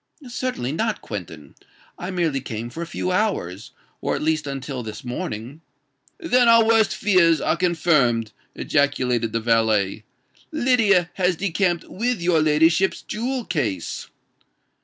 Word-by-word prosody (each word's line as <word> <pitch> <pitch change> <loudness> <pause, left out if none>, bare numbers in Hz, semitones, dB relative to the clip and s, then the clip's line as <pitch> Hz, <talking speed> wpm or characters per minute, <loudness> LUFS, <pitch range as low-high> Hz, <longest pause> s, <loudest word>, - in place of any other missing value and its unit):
"Certainly 240 - -3
not, 215 +7 -1
Quentin: 85 -7 -8 0.5
I 180 - -5
merely 165 -7 -1
came 120 -2 -6
for 165 - -7
a 170 - -4
few 185 - -3
hours—or 180 - -3
at - - -4
least 155 -1 0
until 135 -1 -5
this 110 -2 -8
morning——" 120 +3 -5 0.6
"Then 255 - +3
our 230 -1 +6
worst 225 -2 +3
fears 175 -6 +3
are - - +1
confirmed!" 150 -10 +2 0.2
ejaculated 125 -6 0
the 115 - -1
valet. 110 -3 +1 0.5
"Lydia 230 - +3
has 180 -1 +1
decamped 180 -1 0
with 235 +2 -2
your 170 -2 +2
ladyship's 160 +4 +2
jewel 245 +3 -3
case." 105 - -3
160 Hz, 130 wpm, -22 LUFS, 120-195 Hz, 0.6 s, our